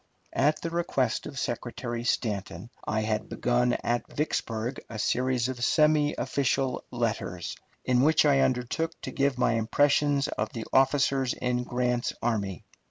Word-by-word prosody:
At 150 +3 +2
the 165 - -2
request 140 -8 0
of 145 -2 -8
Secretary 120 0 -3
Stanton, 110 -1 -2
I 110 0 -1
had 110 0 -2
begun 125 0 +1
at 120 0 -1
Vicksburg 120 -5 -2
a 115 - -6
series 125 +2 +1
of 125 -2 -4
semi 150 0 +3
official 135 -1 0
letters, 115 -7 -2 0.3
in 125 -1 +3
which 155 +2 +4
I 140 -2 +5
undertook 135 +7 0
to - - -5
give 140 -2 +1
my 125 - +2
impressions 140 +5 +2
of 110 - -2
the 115 -2 -5
officers 135 -1 +3
in 125 -1 -1
Grant's 125 -1 0
army. 100 -7 -2
125 Hz, 145 wpm, -28 LUFS, 115-140 Hz, 0.3 s, I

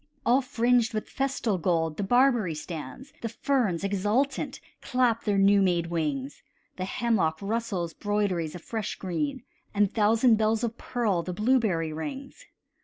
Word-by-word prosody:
All 250 +3 +4
fringed 245 -3 +1
with 215 - -3
festal 255 -7 -1
gold 165 -2 0
the - - -2
barberry 240 - +3
stands; 160 - -8
The 230 - -3
ferns, 230 -8 0
exultant, 205 +8 0 0.2
clap 245 -3 +1
their 205 -2 +1
new 200 +1 +5
made 175 -3 +1
wings; 145 -5 -2 0.4
The 185 - -2
hemlock 190 -7 0
rustles 200 -5 -2
broideries 200 -6 -1
of 175 - -9
fresh 220 -3 -4
green, 260 - -3 0.3
And 205 -1 +2
thousand 225 +2 +4
bells 220 +1 +1
of 230 -1 -1
pearl 220 -10 -1
the 180 +1 -5
blueberry 210 -8 +1
rings. 275 - -7
210 Hz, 145 wpm, -27 LUFS, 175-240 Hz, 0.4 s, new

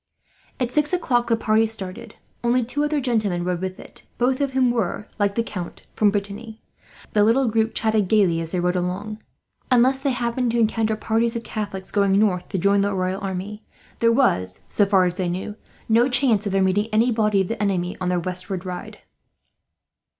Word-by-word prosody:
At 250 -2 -1
six 300 +4 +1
o'clock 245 -9 +1
the 230 - +3
party 220 0 +2
started. 220 +1 -6 0.3
Only 240 0 +2
two 290 +5 -1
other 295 0 0
gentlemen 215 -9 0
rode 180 0 -2
with 185 0 -4
it, - - -13 0.2
both 255 +3 +1
of 275 -2 -1
whom 255 -2 +3
were, 215 -2 -2
like 200 -1 +1
the 230 - +1
Count, 180 -6 -7
from 210 - +3
Brittany. 205 +2 -4 0.5
The 210 - +4
little 240 +5 +3
group 220 0 0
chatted 220 -3 +1
gaily 180 -5 +3
as 165 0 -5
they 180 - -1
rode 180 +1 0
along. 195 +5 -3 0.5
Unless 255 +2 +4
they 275 +1 0
happened 245 0 -1
to - - +1
encounter 220 -1 +1
parties 225 +2 0
of 235 - -3
Catholics 205 -4 -5
going 200 -1 +2
north, 195 -4 +1
to 195 - -2
join 200 +2 +3
the 200 0 0
royal 185 +1 -2
army, 195 +2 -5 0.4
there 230 0 +4
was, 95 - +1
so 205 - +2
far 190 -2 +4
as 180 0 -2
they 185 -3 -1
knew, 190 +4 -4 0.3
no 235 +3 +4
chance 245 -5 +2
of - - -2
their 195 0 +2
meeting 195 +3 +1
any 225 +3 +3
body 215 -3 +2
of 190 - -2
the 230 -2 -3
enemy 185 -3 0
on 180 - 0
their 180 -1 +1
westward 180 +1 -3
ride. 180 -1 -6
210 Hz, 200 wpm, -22 LUFS, 190-235 Hz, 0.5 s, The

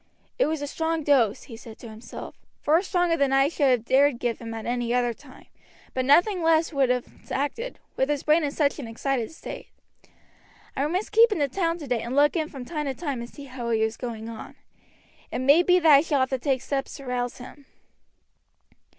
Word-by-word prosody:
"It - - +4
was 310 -2 -2
a - - -3
strong 320 +2 -2
dose," 250 -8 +2
he 240 - -10
said 225 0 -12
to 235 - -10
himself, 220 +2 -9 0.2
"far 315 +4 +3
stronger 355 -3 +1
than 280 -4 +1
I 270 +1 +4
should 290 -4 +1
have 245 -3 +2
dared 275 0 +3
give 240 -1 -2
him 230 -1 -7
at 225 -1 -6
any 240 0 -1
other 245 -1 +1
time, 265 +2 -16 0.5
but 255 -1 -1
nothing 350 +7 +4
less 325 0 +2
would 275 -3 +2
have 250 -1 +1 0.2
acted, 370 - -3 0.2
with 265 - +1
his 290 -2 -1
brain 310 +2 +3
in 290 - 0
such 285 0 0
an 260 - -6
excited 240 +2 -2
state. 320 - -9 1.1
I 280 +2 0
must 365 +6 -2
keep 450 +1 +6
in 415 - 0
the 290 -2 +1
town 335 +2 -1
today 250 -8 -2
and 240 +3 -4
look 290 +3 +4
in 315 -2 -1
from 265 -4 -8
time 300 0 -4
to 270 - -2
time 280 -7 -4
and 235 - -7
see 285 - -11
how 255 -3 -6
he 220 -1 +2
is 220 0 -1
going 230 -2 -6
on. 230 -1 -9 0.8
It - - -2
may 280 +6 +5
be 360 0 +4
that 325 -3 +5
I - - +4
shall 290 -4 0
have 260 - 0
to 265 - -1
take 265 -1 -1
steps 275 -1 -3
to 275 - -10
rouse 245 -1 -3
him." 265 +2 -12
275 Hz, 220 wpm, -25 LUFS, 245-315 Hz, 1.1 s, keep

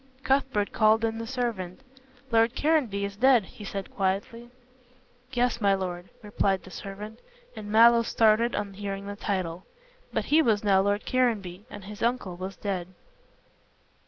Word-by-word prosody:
Cuthbert 265 -6 +1
called 220 +1 +3
in 225 0 -2
the 230 - -5
servant. 230 -6 -3 0.5
"Lord 230 +2 +3
Caranby 260 -11 +1
is 200 0 -6
dead," 250 -1 +5
he 210 - -12
said 195 -1 -6
quietly. 205 +5 -2 0.8
"Yes, 245 -2 0
my 200 -1 +4
lord," 180 -2 -5
replied 200 -2 0
the 185 - -13
servant, 210 +4 -8 0.4
and 210 -1 -7
Mallow 235 +2 +7
started 230 +1 +3
on 205 -1 -3
hearing 200 0 -5
the 205 0 -6
title. 185 -4 -3 0.5
But - - -1
he 310 +2 +4
was 220 -8 +2
now 195 -2 +4
Lord 205 +2 0
Caranby 210 -7 0
and 205 - -9
his 205 +2 -10
uncle 235 -7 -1
was 185 +2 -6
dead. 185 -3 -3
205 Hz, 155 wpm, -27 LUFS, 195-235 Hz, 0.8 s, Mallow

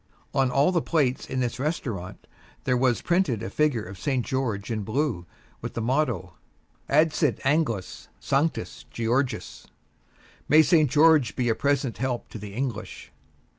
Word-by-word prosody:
On 135 -2 +2
all 140 +7 +3
the 170 -3 +1
plates 140 -7 0
in 130 - -1
this 125 0 -2
restaurant 120 - -4 0.4
there 125 - +1
was 125 -1 +1
printed 170 - +1
a - - -5
figure 150 -8 +1
of 90 +1 -10
St. 130 -1 -1
George 115 -5 -2
in 110 -2 -1
blue, 110 - -2 0.3
with - - -6
the - - -2
motto, 120 - 0 0.6
"Adsit 155 -2 +2
Anglis 135 - 0
Sanctus 145 +4 -1
Georgius" 120 +3 -2 0.8
"May 155 +2 +7
St. 155 -1 +4
George 150 -4 +4
be 125 -2 0
a - - +4
present 135 -4 0
help 125 -2 -2
to 110 - -8
the 100 0 -8
English." 120 -4 -5
130 Hz, 150 wpm, -26 LUFS, 115-150 Hz, 0.8 s, May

